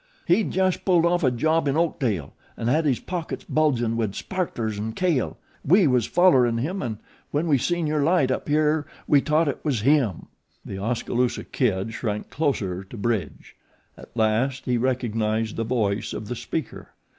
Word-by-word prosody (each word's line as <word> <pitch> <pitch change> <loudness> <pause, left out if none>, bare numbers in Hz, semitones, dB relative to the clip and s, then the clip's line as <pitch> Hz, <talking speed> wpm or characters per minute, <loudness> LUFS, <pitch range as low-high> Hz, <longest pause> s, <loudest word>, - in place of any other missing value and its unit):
"He'd 190 +4 +2
just 185 0 0
pulled 175 -3 +3
off 175 0 +2
a 130 - +5
job 155 +6 +1
in 140 +2 +1
Oakdale 120 - -1 0.2
an' 115 - -4
had 155 +5 +2
his 135 -5 +2
pockets 175 -3 -5
bulgin' 125 -7 +1
wid 110 -4 -1
sparklers 120 - -3
an' 110 +1 -3
kale. 170 -2 0 0.3
We 185 +6 +5
was 125 -5 +2
follerin' 130 -10 +4
him 175 +11 -2
an' 110 -3 -3 0.3
when 150 +3 0
we 140 -4 +3
seen 175 +4 0
your 150 -1 0
light 150 -3 +3
up 130 - -3
here 150 0 +2 0.2
we 145 -2 +5
t'ought 155 +2 +2
it 140 - -3
was 135 -8 0
him." 130 - +2 0.4
The 95 - -6
Oskaloosa 120 +3 -1
Kid 110 -3 -1
shrank 105 -3 -4
closer 105 - -1
to 95 +5 -11
Bridge. 105 -5 -3 0.4
At - - -14
last 115 +5 +1
he 125 - +1
recognized 115 -3 0
the 115 - -1
voice 110 -3 -1
of 105 - -6
the 125 - -2
speaker. - - -5
130 Hz, 175 wpm, -24 LUFS, 110-155 Hz, 0.4 s, a